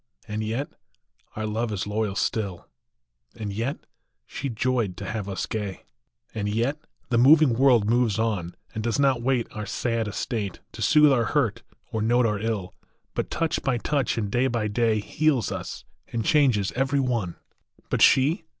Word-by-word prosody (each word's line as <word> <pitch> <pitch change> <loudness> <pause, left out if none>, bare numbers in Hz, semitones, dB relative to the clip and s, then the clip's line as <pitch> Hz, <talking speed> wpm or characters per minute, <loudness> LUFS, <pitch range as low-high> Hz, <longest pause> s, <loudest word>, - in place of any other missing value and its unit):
And 105 +1 -3
yet 115 +7 -2 0.7
our 110 - -3
love 110 +2 -2
is 100 -3 -2
loyal 105 -1 -1
still; 100 -5 -2 0.7
And 105 -2 -5
yet 115 +7 -3 0.4
she 140 - -5
joyed 115 -5 -1
to 100 - -6
have 105 -1 -4
us 95 -2 -2
gay; 105 -4 -4 0.5
And 105 -1 -2
yet 120 +8 0 0.3
the 120 -2 +2
moving 145 +1 +6
world 120 -4 +4
moves 115 -2 +2
on, 105 -7 -1 0.2
And 110 - -4
does 115 -1 0
not 135 -3 +3
wait 125 -1 +1
our 105 -1 -6
sad 115 +2 -1
estate, 105 -1 -3
To - - -9
soothe 150 -1 +6
our 120 -3 +2
hurt 115 -4 0 0.3
or 110 -2 -1
note 120 +3 +3
our 105 -2 0
ill, 105 -4 -3 0.4
But, - - -2
touch 165 -1 -1
by 130 -3 0
touch, 140 +2 0
and 105 -3 -2
day 125 +4 +2
by 120 -4 -1
day, 110 0 +2
Heals 150 +1 +1
us, - - -6 0.2
and 115 -2 -3
changes 125 -10 +3
every 135 +2 0
one. 120 -9 -1 0.6
But - - 0
she 155 +7 +5
115 Hz, 170 wpm, -25 LUFS, 105-130 Hz, 0.7 s, moving